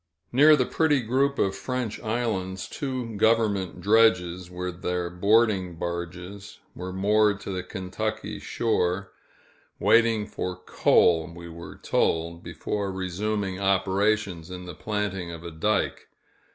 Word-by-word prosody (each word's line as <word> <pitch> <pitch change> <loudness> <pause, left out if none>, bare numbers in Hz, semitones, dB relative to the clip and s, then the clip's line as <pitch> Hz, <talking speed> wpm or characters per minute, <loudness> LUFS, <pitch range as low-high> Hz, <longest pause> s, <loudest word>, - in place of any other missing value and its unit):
Near 150 +5 +7
the 130 -4 +1
pretty 150 -2 +2
group 135 +4 +1
of 95 0 +1
French 125 +2 -3
Islands, 105 -5 -2
two 130 -6 -4
government 105 -4 +2
dredges, 90 -5 +3
with 90 0 -5
their 90 -1 -2
boarding 100 -1 +2
barges, 90 +4 -6 0.2
were 90 +1 -6
moored 105 +2 +2
to 100 - -5
the 95 -1 -2
Kentucky 110 +4 -4
shore 95 -4 -1 0.7
waiting 115 -2 +4
for 90 -3 -4
coal, 80 -2 +3
we 85 0 -10
were 85 +1 -9
told, 85 +1 0
before 100 +1 -3
resuming 95 +1 -2
operations 95 -2 +1
in 90 0 -7
the 90 - -7
planting 105 -4 -3
of 85 -1 -8
a 85 - -6
dike. 100 +6 -1
95 Hz, 125 wpm, -26 LUFS, 90-110 Hz, 0.7 s, Near